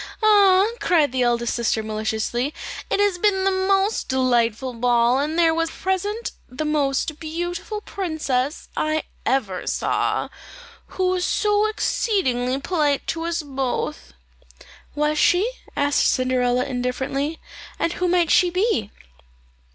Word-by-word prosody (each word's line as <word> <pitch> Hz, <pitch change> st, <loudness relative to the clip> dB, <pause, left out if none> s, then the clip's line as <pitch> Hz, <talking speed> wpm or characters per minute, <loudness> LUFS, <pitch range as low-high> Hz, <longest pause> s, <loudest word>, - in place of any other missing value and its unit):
"Ah," 400 Hz, -3 st, +6 dB
cried 310 Hz, -7 st, +2 dB
the 260 Hz, 0 st, -1 dB
eldest 235 Hz, -1 st, +1 dB
sister 225 Hz, -2 st, 0 dB
maliciously, 220 Hz, +5 st, -2 dB, 0.3 s
"it -, -, 0 dB
has 405 Hz, -3 st, +2 dB
been 385 Hz, -1 st, +2 dB
the 390 Hz, -, +3 dB
most 390 Hz, +2 st, +1 dB
delightful 250 Hz, -1 st, +1 dB
ball, 240 Hz, +1 st, +2 dB
and 305 Hz, +3 st, -1 dB
there 330 Hz, -1 st, +4 dB
was 330 Hz, 0 st, 0 dB
present 405 Hz, +6 st, -2 dB, 0.2 s
the 265 Hz, +5 st, -4 dB
most 295 Hz, 0 st, 0 dB
beautiful 350 Hz, +6 st, -4 dB
princess 310 Hz, -8 st, -2 dB
I 310 Hz, 0 st, 0 dB, 0.2 s
ever 210 Hz, -9 st, -1 dB
saw, -, -, 0 dB, 0.7 s
who 375 Hz, -, +1 dB
was 365 Hz, -1 st, 0 dB
so 420 Hz, +2 st, +2 dB
exceedingly 275 Hz, -, 0 dB
polite 295 Hz, -3 st, 0 dB
to 330 Hz, 0 st, -2 dB
us 340 Hz, -1 st, -2 dB
both." 255 Hz, -, -3 dB, 0.8 s
"Was 300 Hz, +1 st, +1 dB
she?" 365 Hz, +5 st, +4 dB, 0.3 s
said 285 Hz, 0 st, +1 dB
Cinderella 255 Hz, -2 st, +2 dB
indifferently; 265 Hz, +4 st, -2 dB, 0.4 s
"and 335 Hz, -, 0 dB
who 365 Hz, -, -1 dB
might 350 Hz, -2 st, +2 dB
she 360 Hz, -, +5 dB
be?" 360 Hz, -, 0 dB
300 Hz, 130 wpm, -22 LUFS, 250-365 Hz, 0.8 s, Ah